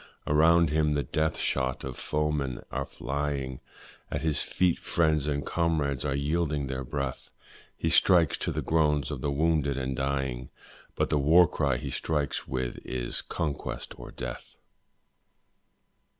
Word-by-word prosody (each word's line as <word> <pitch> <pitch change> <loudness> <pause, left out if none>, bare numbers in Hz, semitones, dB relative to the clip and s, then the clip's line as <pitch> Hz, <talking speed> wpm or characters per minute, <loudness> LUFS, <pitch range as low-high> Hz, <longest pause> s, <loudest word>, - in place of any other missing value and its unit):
Around 80 +1 +5
him 75 -1 +2
the 70 - +1
death 80 +5 0
shot 65 -1 -1
of 65 -2 -5
foemen 75 -4 -1
are - - -2
flying, 70 -2 -3 0.5
At 70 - -3
his 80 -2 +1
feet 90 -2 +1
friends 80 -3 +1
and 70 -2 -1
comrades 75 -6 0
are 70 -2 0
yielding 75 0 0
their 65 0 -3
breath; 65 +1 -4 0.5
He - - 0
strikes 85 -5 +5
to - - -1
the - - -2
groans 75 -2 +2
of 70 -4 -4
the 70 - 0
wounded 75 -1 +1
and 65 0 -2
dying, 65 -2 -2 0.5
But - - 0
the 75 - +3
war 80 +5 +6
cry 70 -4 0
he - - -5
strikes 75 -3 -1
with 65 -2 -3
is, 60 -1 -2
'conquest 75 -4 -4
or - - -8
death!' - - -7
70 Hz, 150 wpm, -28 LUFS, 65-80 Hz, 0.5 s, war